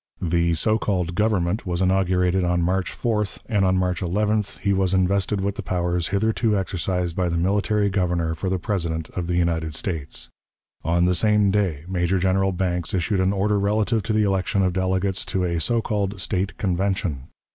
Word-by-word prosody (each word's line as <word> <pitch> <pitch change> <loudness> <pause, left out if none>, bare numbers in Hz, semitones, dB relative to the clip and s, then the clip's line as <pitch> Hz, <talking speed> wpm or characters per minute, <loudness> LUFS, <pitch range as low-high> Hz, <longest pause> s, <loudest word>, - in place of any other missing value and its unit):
The 85 -1 +1
so 110 +7 +1
called 90 -5 -1
Government 105 -1 0
was 90 -1 -1
inaugurated 95 -1 +2
on 90 0 +1
March 90 +2 0
4th, 105 -6 -1
and 105 -5 +1
on 95 0 +3
March 90 -1 0
11th 105 +3 0
he 100 -1 0
was 95 -1 +1
invested 95 +2 +1
with 100 +1 -2
the - - -2
powers 90 -1 -1
hitherto 110 +1 +1
exercised 90 -2 -2
by 90 -2 0
the 85 - -1
military 100 +3 +1
Governor 90 -4 0
for 95 +4 -3
the 95 - 0
President 85 -4 -2
of 90 -2 -4
the 90 - -1
United 80 -3 0
States. 80 -5 -4 0.6
On 85 +2 +2
the 90 - +3
same 105 +1 +3
day 95 -8 0
Major 90 0 0
General 95 +1 +2
Banks 90 -1 -1
issued 95 +2 0
an 95 +1 +2
order 100 +1 +1
relative 105 +2 +1
to 110 +2 -2
the 110 0 +3
election 95 0 +1
of 90 -1 +1
delegates 95 +1 0
to 95 - -1
a 85 -2 0
so 115 +8 +1
called 100 -2 -2
State 95 +1 -2
Convention. 95 - -1
95 Hz, 185 wpm, -23 LUFS, 85-100 Hz, 0.6 s, on